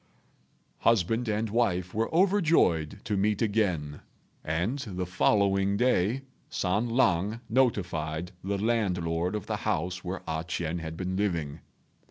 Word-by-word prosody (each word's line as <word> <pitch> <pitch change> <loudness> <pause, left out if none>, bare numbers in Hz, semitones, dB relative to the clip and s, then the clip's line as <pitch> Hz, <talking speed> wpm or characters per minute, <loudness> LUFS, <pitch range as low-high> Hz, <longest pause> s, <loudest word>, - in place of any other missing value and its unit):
Husband 115 +2 +2
and 110 0 -1
wife 95 -6 0
were 110 +2 -1
overjoyed 165 - +3
to 105 - -1
meet 105 +1 +1
again, 90 -10 0 0.4
and 85 - -1
the 95 -8 -4
following 100 +2 +2
day 125 +1 +2 0.3
San 105 +6 0
lang 110 -3 +2
notified 90 -9 0
the 100 +1 -1
landlord 90 -5 0
of 105 - -4
the - - -2
house 90 +3 -2
where 90 +1 -5
A 80 0 -2
ch'ien 85 -1 -3
had 80 0 -6
been 95 +1 -3
living. 85 -8 -1
95 Hz, 130 wpm, -28 LUFS, 85-110 Hz, 0.4 s, overjoyed